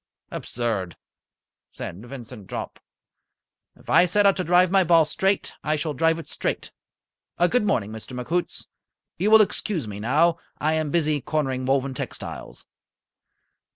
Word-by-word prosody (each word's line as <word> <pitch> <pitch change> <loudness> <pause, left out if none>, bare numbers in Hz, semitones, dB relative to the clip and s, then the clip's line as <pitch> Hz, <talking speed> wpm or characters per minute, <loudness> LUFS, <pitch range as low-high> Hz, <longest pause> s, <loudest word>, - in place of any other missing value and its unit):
"Absurd!" 110 -7 -3 0.7
said 95 +6 -8
Vincent 120 -5 -10
Jopp. - - -6 1.0
"If - - -21
I - - +6
set 205 +4 +2
out 195 - +5
to 185 - 0
drive 180 +1 +4
my 195 -1 +5
ball 165 -2 +5
straight, 195 +4 0
I 155 - +1
shall 155 0 -2
drive 165 +4 +2
it 165 - -8
straight. - - -3 0.7
Good 195 +6 +2
morning, 110 - 0
Mr. 110 +3 -7
McHoots. 170 +8 -2 0.5
You 200 +4 +2
will 220 0 +8
excuse 190 - -3
me 100 -1 -6
now. 155 +9 +2 0.2
I 155 +1 +1
am 155 -1 0
busy 155 -2 +1
cornering 130 -4 -1
Woven 135 0 +1
Textiles." - - -7
155 Hz, 145 wpm, -24 LUFS, 125-175 Hz, 1.0 s, will